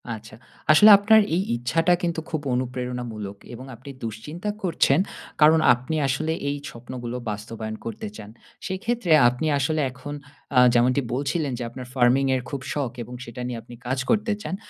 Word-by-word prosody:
আচ্ছা। 110 0 -12 0.4
আসলে 210 +8 +8
আপনার 220 +2 +5
এই 185 - +2
ইচ্ছাটা 165 +9 +2
কিন্তু 170 -1 -1
খুব 160 -2 -2
অনুপ্রেরণামূলক 125 -5 -4 0.2
এবং 125 +2 -9
আপনি 130 +5 -12
দুশ্চিন্তা 150 - -5
করছেন 165 -4 +3 0.4
কারণ 155 +1 +7
আপনি 125 +6 -4
আসলে 155 +4 -1 0.2
এই 145 - -2
স্বপ্নগুলো 120 0 -6
বাস্তবায়ন 110 +1 -5
করতে 110 -2 -5
চান। 105 -1 -10 0.4
সেই 190 -1 -3
ক্ষেত্রে 235 -7 -1 0.2
আপনি 125 +6 -3
আসলে 155 +3 0
এখন 130 +4 -8 0.4
আ - - +9
যেমনটি 125 +3 +3
বলছিলেন 140 +3 -1
যে - - -3
আপনার 125 +1 -8
Farming 130 +1 +3
এর 130 - -1
খুব 140 -2 -4
শখ 140 -5 -2
এবং 125 - -11
সেটা 120 +1 -8
নিয়ে 120 -2 -4
আপনি 120 - -12
কাজ 130 +1 0
করতে 215 0 +2
চান। 190 - -4
130 Hz, 165 wpm, -24 LUFS, 120-160 Hz, 0.4 s, আ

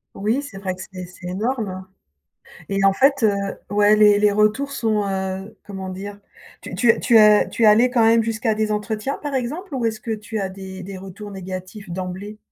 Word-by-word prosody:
Oui, 220 +7 0
c'est 285 -9 -10
vrai 195 -1 -3
que 185 - -10
c'est 185 -1 -7
c'est 180 0 -11
énorme 195 -1 -3 0.8
et 195 0 +1
en 195 - +5
fait, 275 +3 +3
heu, 210 -2 +4 0.3
ouais 205 +1 +4
les 210 -1 +6
les 210 0 +4
retours 215 +7 +1
sont, 220 -5 0
heu, 190 +1 -3
comment 190 -2 -6
dire, 200 +2 -7 0.4
tu - - -9
tu 235 0 +4
as 210 -1 +6
tu 235 - -3
es - - +7
allée 220 +4 +6
quand 240 -3 +3
même 225 0 +5
jusqu'à 225 0 -1
des 215 0 0
entretiens, 215 +4 -2
par 290 -2 -3
exemple, 295 +8 -4
ou 250 - -2
est-ce 220 -1 -1
que 230 - -5
tu 215 +1 -5
as 195 - -1
des 190 0 -9
des 190 +1 -8
retours 195 +2 -9
négatifs 190 +1 -8
d'emblée? 185 +4 -6
210 Hz, 200 wpm, -21 LUFS, 190-225 Hz, 0.8 s, es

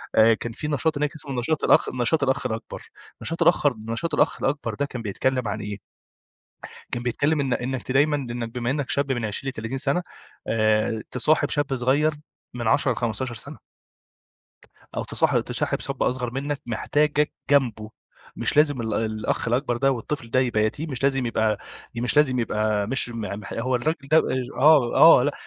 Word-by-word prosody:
آآ، 110 +1 +6
كان 115 +1 -4
في 150 +6 -5
نشاط 150 +1 0
هناك 150 0 -1
اسمه 140 -5 -4
نشاط 150 +5 -1
الأخ - - +4
نشاط 125 +5 +2
الأخ 130 -1 0
الأكبر، 115 -2 -4 0.4
نشاط 165 - -4
الأخر 150 -5 +4
نشاط 150 +8 -2
الأخ - - +1
الأكبر، 135 -4 -1
ده 145 +7 -1
كان 125 -4 -6
بيتكلَّم 125 +4 -1
عن - - -3
إيه؟ 105 -1 -5 1.2
كان 120 - -2
بيتكلَّم 145 +5 0
إن 135 -3 -1
إنِّك 130 0 -2
ت 125 - -4
دايمًا 145 +2 +3
إنِّك 120 -4 -4
بما 125 0 -1
إنِّك 145 -1 -2
شاب 140 -1 +1
من 120 -3 -2
20 110 +6 -3
ل30 125 +1 -5
سنة، 145 +7 +1 0.4
آآ، 110 0 +1
تصاحِب 150 +5 +2
شاب 145 -2 0
صغير 135 +5 +2 0.4
من 120 -2 -4
10 135 +2 +3
ل15 120 +1 -3
سنة. 110 - -7 1.4
أو - - -2
تصاحب - - +1
تصاحب - - -2
شاب - - -4
أصغر 125 -1 0
منك، 140 +2 -3
محتاجك 145 +5 +1 0.2
جنبه. 115 -7 +2 0.5
مش - - -1
لازم 145 -4 +4
ال 110 -2 -2
الأخ 110 +1 -1
الأكبر 120 +1 0
ده 135 +3 +2
والطفل 120 -1 -5
ده 130 - +3
يبقى 120 -4 +1
يتيم، 145 +9 -3
مش 130 -1 -5
لازم 135 -2 +1
يبقى 110 -2 0 0.4
ي 115 - -4
مش 125 +4 -1
لازم 130 -4 +4
يبقى 105 -2 0
مش 130 +1 +1
م 115 -1 -6 0.2
مح 100 - -9
هو 125 +2 0
الرجل 140 +2 -2
ده 155 - +5
آآ، 130 -4 0 0.2
آه 145 -4 +7
آه، - - +2
لا، - - +1
125 Hz, 185 wpm, -24 LUFS, 115-145 Hz, 1.4 s, آه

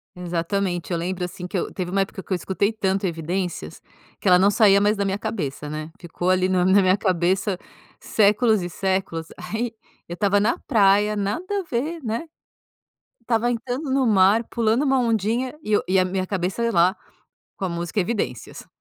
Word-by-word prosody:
Exatamente, 175 +1 -2
eu 170 - +1
lembro, 180 +2 -3
assim, 180 0 -6
que 185 - -3
eu - - -2
teve 180 -2 -4
uma 195 +2 +1
época 195 0 -4
que 190 - -4
eu - - +3
escutei 190 +4 -1
tanto 195 -2 0
Evidências 175 +2 -4 0.4
que - - -4
ela 180 -1 +7
não 195 +3 +4
saía 205 -2 +5
mais 210 +1 +2
da 200 - 0
minha 195 0 -1
cabeça, 155 -10 -4
né? 155 +1 -5
Ficou 175 +1 -3
ali 185 0 +3
no 180 -1 +2
na 190 +2 +5
minha 185 +1 +3
cabeça 185 +1 0 0.4
séculos 215 0 +2
e 175 - -4
séculos, 190 -3 -2
aí 220 +6 -4 0.4
eu - - -4
estava 205 +1 +2
na 220 +4 +1
praia, 210 -3 +4
nada 270 - -2
a - - -4
ver, 315 +2 -3
né, 230 +7 -3 0.9
estava 235 0 0
entrando 250 +4 -3
no 265 0 +2
mar, 205 +2 +4
pulando 230 +3 +1
uma 270 -2 +2
ondinha 235 +3 0
e 215 - -2
eu - - +3
e 190 - +2
a 185 - +3
minha 185 0 -2
cabeça 190 +3 -2
lá 180 -1 +3 0.6
com - - -8
a - - -2
música 170 +3 -3
Evidências. 180 - -4
195 Hz, 190 wpm, -23 LUFS, 180-220 Hz, 0.9 s, ela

